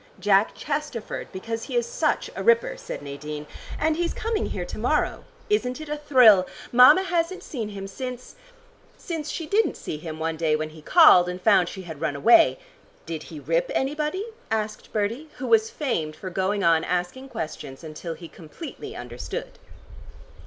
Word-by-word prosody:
"Jack 200 +2 +3
Chesterford, 295 -6 -4
because 225 +4 -5
he - - -6
is 480 - +2
such - - -1
a - - -4
ripper," 470 +2 +3
said - - -7
Nadine. 150 +1 -6 0.3
"And 315 +1 +1
he's 345 0 -1
coming 440 -1 -1
here - - -4
to - - -7
morrow. - - 0 0.2
Isn't 280 -12 0
it 310 -1 -8
a 300 - -1
thrill? 245 -10 +6 0.2
Mama 250 +10 +8
hasn't 360 0 -1
seen 230 -7 -5
him 195 -1 -7
since 250 +5 -7 0.6
since 320 -4 -5
she 330 - -4
didn't 415 +8 +1
see 150 - -5
him 155 0 -7
one 160 0 -2
day 160 -2 +2
when 155 0 -3
he 155 0 -13
called, 180 - +7
and 180 0 -5
found 185 -3 +4
she 190 - -8
had 160 -4 -9
run 145 - -1
away 235 - +5 0.2
" - - -31
"Did 165 -2 -5
he 155 - -8
rip 165 +5 0
anybody?" 300 +8 -1 0.2
asked 215 -1 -3
Bertie, 230 +9 -2
who 260 - -5
was 445 - +4
famed 235 - -2
for 185 +3 -7
going 195 +2 0
on 165 -1 +4
asking 180 +10 -2
questions, 155 - -6
until 160 +1 -6
he 170 - -10
completely 185 - -9
understood. 120 0 -6
215 Hz, 175 wpm, -25 LUFS, -, 0.6 s, Mama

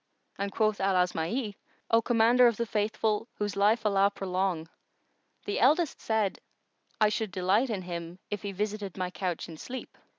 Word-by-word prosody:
and 200 0 -2
quoth 215 0 +1
Al 195 0 +2
Asma'i, 180 +6 0 0.4
"O 230 0 +5
Commander 240 +1 +5
of 235 -3 +1
the 235 - 0
Faithful, 215 0 0
whose 205 -1 -2
life 215 +3 +3
Allah 200 -1 +4
prolong! 185 -4 -2 0.8
the 205 - -1
eldest 300 +5 +3
said, 220 -3 0 0.6
'I 215 -1 +5
should 215 -1 -2
delight 195 +7 +2
in 200 -5 -2
him, 170 0 -6
if 205 - -2
he 200 - -4
visited 205 -1 -3
my 180 -1 -2
couch 180 -3 -3
in 165 -2 -9
sleep. 255 +9 -7
205 Hz, 165 wpm, -29 LUFS, 185-220 Hz, 0.8 s, O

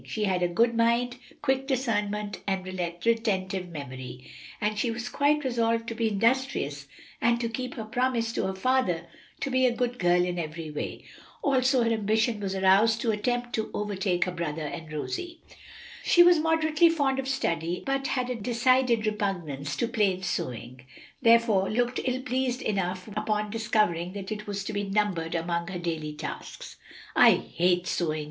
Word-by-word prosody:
She 215 - -3
had 185 -3 +1
a 175 - +3
good 230 +7 +2
mind, 235 +2 +2 0.3
quick 270 -1 +1
discernment 210 -6 -1
and 190 -1 -1
retentive 185 +1 -1
memory, 130 -4 -8 0.3
and 210 0 0
she 240 - +1
was 240 +1 -4
quite 295 +1 +2
resolved 230 -2 0
to - - -3
be 225 0 0
industrious 215 - 0 0.3
and 235 0 +3
to 235 - -1
keep 250 +2 -5
her 225 - -4
promise 235 0 0
to - - -1
her 190 - -3
father 190 -6 +1 0.4
to 275 - -2
be 260 0 +4
a 240 - 0
good 245 0 -1
girl 175 0 +3
in 180 -1 -2
every 160 -1 -5
way. 150 - -5 0.4
Also 260 -2 +3
her 230 - +1
ambition 220 +1 +1
was 195 -1 -3
aroused 195 +4 +4
to 235 -4 +1
attempt 245 +3 -1
to 220 - -1
overtake 195 -3 0
her 180 - -3
brother 165 -3 -3
and 155 +1 -6
Rosie. 340 - -4 0.6
She 345 - +7
was 350 -2 +6
moderately 320 +1 +3
fond 280 -5 +1
of 270 - -3
study, 170 -10 -1
but 275 0 0
had 255 -1 -1
a - - -1
decided 240 +1 +2
repugnance 175 -10 -2
to 235 - 0
plain 205 -6 +1
sewing, 125 -7 -4 0.4
therefore 230 -4 +4
looked 245 +3 0
ill 255 0 -1
pleased 255 -1 -1
enough 185 -3 -2
upon 210 0 -1
discovering 210 -6 0
that 200 0 -6
it 210 0 -5
was 200 -1 -3
to 215 - -5
be 205 - -1
numbered 195 -5 -1
among 170 0 -1
her 185 -1 -4
daily 160 -3 -3
tasks. 150 - -7 0.4
"I - - +8
hate 180 +1 0
sewing!" 155 -4 -1
215 Hz, 170 wpm, -27 LUFS, 180-245 Hz, 0.6 s, I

